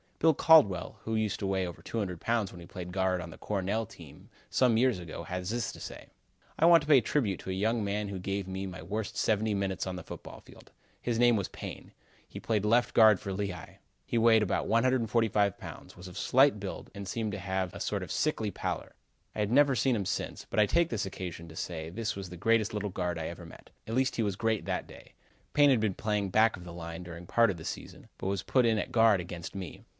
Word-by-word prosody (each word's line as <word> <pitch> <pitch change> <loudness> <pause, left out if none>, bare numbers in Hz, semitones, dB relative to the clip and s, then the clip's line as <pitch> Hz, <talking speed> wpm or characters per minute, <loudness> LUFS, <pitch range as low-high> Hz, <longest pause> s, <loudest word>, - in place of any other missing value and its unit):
Bill 160 0 +4
Caldwell, 135 - +5
who 110 - -2
used 110 -2 0
to 100 - -2
weigh 95 -1 0
over 85 - -8
200 95 -7 -4
pounds 115 -4 0
when 90 - -11
he 85 - -11
played 90 -2 -7
guard 95 -1 0
on 85 -1 -8
the - - -13
Cornell 105 +2 -1
team - - -14 0.2
some 125 -4 +3
years 125 -4 +3
ago, 85 -1 -7
has 90 +2 -4
this 115 -1 -1
to - - -12
say: - - -9 0.5
"I 160 - +5
want 170 -1 +8
to - - -9
pay 145 -3 +7
a - - -3
tribute 110 - 0
to - - -8
a - - -1
young 110 +4 0
man 100 +1 -1
who 100 -1 -5
gave 95 +1 -3
me 95 +1 -4
my 90 -3 -8
worst 105 +4 -4
seventy 110 0 +1
minutes 95 -1 -2
on 95 - -3
the 90 - -7
football - - -9
field. - - -17 0.3
His 120 -2 -1
name 120 0 +5
was 100 -3 -1
Payne. - - -8 0.4
He - - -8
played 105 -2 0
left 120 +3 +3
guard 110 -4 +7
for 100 - -5
Lehigh. 95 -4 -5 0.3
He 120 - -1
weighed 110 -1 +5
about 100 - -1
145 115 -4 +2
pounds; - - -10
was 90 +1 -9
of 90 - -10
slight 135 -3 +4
build 100 -1 -6
and 100 -1 -7
seemed 110 +2 -2
to 100 - -4
have 95 -2 -2
a - - -8
sort - - -2
of - - -7
sickly 115 -9 0
pallor. - - -4 0.4
I - - -4
have 105 0 0
never 140 +1 +5
seen 130 0 +2
him 100 -3 -2
since, 100 - -3
but - - 0
I 105 - +5
take 170 +5 +2
this 105 -4 -2
occasion 90 -3 -6
to 80 - -12
say 80 -1 -4
this 115 +5 -3
was 95 -2 -6
the 90 - -9
greatest 110 +2 +2
little 105 -1 -2
guard 90 -2 -2
I 80 - -3
ever 85 0 -8
met. 80 - -14 0.2
At 115 - -3
least 130 0 +1
he 115 - +2
was 100 -3 -1
great 110 0 0
that - - -2
day. - - -14 0.4
Payne 145 -1 +6
had 125 - +4
been 105 -4 0
playing 105 -2 -1
back 110 +3 +4
of 90 - -11
the 85 -1 -9
line 85 0 -7
during 85 0 -9
part 115 +5 +4
of 95 - -2
the 80 - -9
season, - - -7
but - - -3
was 100 0 -1
put 125 -3 +3
in 110 -1 +3
at - - -3
guard 115 -4 +5
against 85 0 -7
me. 95 -5 -7
100 Hz, 245 wpm, -30 LUFS, 90-115 Hz, 0.5 s, want